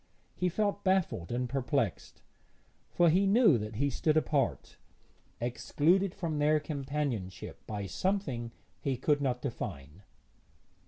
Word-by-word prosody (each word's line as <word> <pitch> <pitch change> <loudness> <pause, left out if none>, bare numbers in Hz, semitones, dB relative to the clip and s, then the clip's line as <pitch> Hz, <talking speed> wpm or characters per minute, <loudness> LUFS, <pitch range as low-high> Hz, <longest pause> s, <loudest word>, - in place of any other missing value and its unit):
He 180 - +1
felt 205 +2 -1
baffled 185 - +1
and 125 +1 -1
perplexed, 125 - -2 0.7
for 175 -2 +4
he 190 +4 +3
knew 200 - +5
that 105 +1 -5
he 140 +5 +1
stood 155 +4 +1
apart, 145 -4 0 0.6
excluded 165 - +1
from 165 -6 -2
their 150 +1 +4
companionship 140 - -4
by 105 -2 -4
something 125 - -2 0.3
he 135 -3 -1
could 145 +3 +1
not 125 -3 -1
define. 85 - -5
140 Hz, 120 wpm, -31 LUFS, 120-170 Hz, 0.7 s, knew